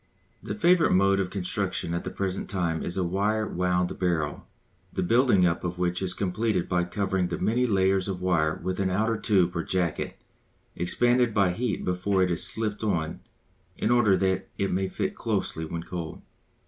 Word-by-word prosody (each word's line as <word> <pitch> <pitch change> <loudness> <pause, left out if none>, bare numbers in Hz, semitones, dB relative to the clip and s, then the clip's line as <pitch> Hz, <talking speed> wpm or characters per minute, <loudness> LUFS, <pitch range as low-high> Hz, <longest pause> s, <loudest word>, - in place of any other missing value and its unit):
The - - -5
favourite 180 -4 +4
mode 100 +1 +4
of 95 -2 -1
construction 90 -2 -2
at 85 - -2
the - - -4
present 95 -1 -3
time 85 -4 -1
is 85 - -2
the 95 - 0
wire 100 +5 0
wound 90 0 -1
barrel, 85 -5 -1 0.4
the - - -2
building 115 -2 +4
up 85 -1 0
of 90 0 -3
which 90 0 0
is 90 -1 -1
completed 100 0 -1
by 90 -1 +1
covering 95 0 -1
the 85 -1 -3
many 125 +3 +1
layers 95 -2 +2
of 95 -2 -3
wire 85 -4 +1
with 95 +1 -2
an 95 -1 +1
outer 110 +5 +1
tube 95 -5 +2
or 85 - -1
jacket 90 -3 -2 0.6
expanded 120 +6 +2
by 100 -3 +4
heat 115 +3 -2
before 95 +1 +1
it 90 - +1
is 85 - +1
slipped 110 -1 -1
on 85 -7 -1 0.6
in - - 0
order 110 -6 +4
that 95 0 0
it 95 - 0
may 95 +1 0
fit - - -2
closely 80 - -2
when 85 +1 -5
cold. 85 -2 -6
95 Hz, 185 wpm, -27 LUFS, 90-100 Hz, 0.6 s, favourite